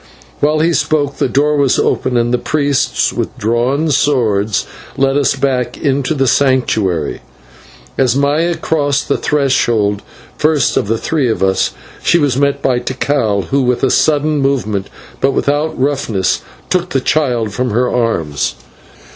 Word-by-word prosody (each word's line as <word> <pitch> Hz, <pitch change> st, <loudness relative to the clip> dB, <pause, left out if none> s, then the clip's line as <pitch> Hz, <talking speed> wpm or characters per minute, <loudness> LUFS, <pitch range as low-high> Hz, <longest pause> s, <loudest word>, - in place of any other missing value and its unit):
While 155 Hz, +1 st, +2 dB
he 170 Hz, +2 st, +2 dB
spoke, 145 Hz, -2 st, 0 dB
the -, -, 0 dB
door 145 Hz, +4 st, +2 dB
was 140 Hz, -3 st, +2 dB
opened, 125 Hz, -, 0 dB
and 120 Hz, +1 st, +1 dB
the 125 Hz, -, +2 dB
priests 145 Hz, -3 st, 0 dB
with -, -, -4 dB
drawn 125 Hz, +8 st, 0 dB
swords 110 Hz, -8 st, +1 dB, 0.3 s
led 135 Hz, 0 st, +2 dB
us 140 Hz, -2 st, +2 dB
back 125 Hz, -3 st, -1 dB
into 140 Hz, +1 st, 0 dB
the 135 Hz, -1 st, +1 dB
Sanctuary. 115 Hz, -, +1 dB, 0.8 s
As 130 Hz, -2 st, +3 dB
Maya 150 Hz, +5 st, +1 dB
crossed 145 Hz, -3 st, 0 dB
the -, -, +2 dB
threshold 120 Hz, -8 st, +1 dB, 0.4 s
first 155 Hz, -1 st, +2 dB
of -, -, 0 dB
the 115 Hz, +2 st, 0 dB
three 140 Hz, 0 st, 0 dB
of 110 Hz, -, -1 dB
us, 95 Hz, 0 st, +1 dB, 0.3 s
she 170 Hz, -, +3 dB
was 145 Hz, -6 st, +1 dB
met 140 Hz, +1 st, 0 dB
by 125 Hz, -2 st, +2 dB
Tikal, 120 Hz, -5 st, -1 dB
who 140 Hz, 0 st, +2 dB
with 125 Hz, 0 st, 0 dB
a 135 Hz, -, +3 dB
sudden 150 Hz, 0 st, +2 dB
movement, 110 Hz, -8 st, -1 dB, 0.3 s
but 135 Hz, 0 st, +1 dB
without 145 Hz, +3 st, -1 dB
roughness, 130 Hz, -9 st, 0 dB, 0.3 s
took 180 Hz, -1 st, 0 dB
the 135 Hz, -, 0 dB
child 125 Hz, -7 st, 0 dB
from 125 Hz, +3 st, -1 dB
her 125 Hz, +4 st, +1 dB
arms. 85 Hz, -, -1 dB
135 Hz, 155 wpm, -15 LUFS, 120-145 Hz, 0.8 s, As